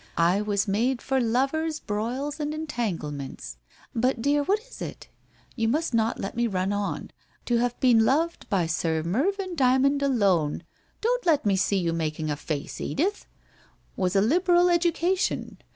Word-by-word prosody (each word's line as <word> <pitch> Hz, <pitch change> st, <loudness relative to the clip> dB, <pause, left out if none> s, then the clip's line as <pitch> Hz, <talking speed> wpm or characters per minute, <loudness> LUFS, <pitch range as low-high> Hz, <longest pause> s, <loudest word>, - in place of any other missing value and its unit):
I 175 Hz, +4 st, +3 dB
was 205 Hz, -1 st, 0 dB
made 235 Hz, +6 st, +1 dB
for 265 Hz, +1 st, 0 dB
lovers 275 Hz, +7 st, 0 dB
broils 250 Hz, +8 st, -3 dB
and 300 Hz, 0 st, -2 dB
entanglements. 165 Hz, -, -4 dB, 0.4 s
But 250 Hz, +2 st, +1 dB
dear, 285 Hz, +4 st, +2 dB
what 390 Hz, +9 st, +2 dB
is -, -, -14 dB
it? -, -, -7 dB, 0.5 s
You 225 Hz, -3 st, 0 dB
must 295 Hz, +3 st, 0 dB
not 225 Hz, 0 st, +1 dB
let 195 Hz, -, -4 dB
me 235 Hz, 0 st, +1 dB
run 190 Hz, -1 st, -1 dB
on. 205 Hz, 0 st, -3 dB, 0.3 s
To 240 Hz, -, +2 dB
have 245 Hz, 0 st, -1 dB
been 240 Hz, -4 st, +5 dB
loved 320 Hz, +8 st, 0 dB
by 190 Hz, -5 st, +2 dB
Sir 160 Hz, -1 st, -1 dB
Mervyn 365 Hz, -, -1 dB
Dymond 275 Hz, -1 st, +3 dB
alone 200 Hz, -, +1 dB, 0.2 s
— -, -, -39 dB
don't -, -, 0 dB
let 310 Hz, -8 st, +3 dB
me 200 Hz, -2 st, +3 dB
see 200 Hz, +1 st, +1 dB
you 170 Hz, -3 st, 0 dB
making 155 Hz, -1 st, -2 dB
a -, -, 0 dB
face, 145 Hz, -1 st, -5 dB
Edith! 385 Hz, +8 st, -1 dB, 0.3 s
— -, -, -34 dB
was 185 Hz, 0 st, -1 dB
a 195 Hz, -, +5 dB
liberal 350 Hz, -, +4 dB
education. 345 Hz, +2 st, 0 dB
240 Hz, 170 wpm, -26 LUFS, 195-305 Hz, 0.5 s, been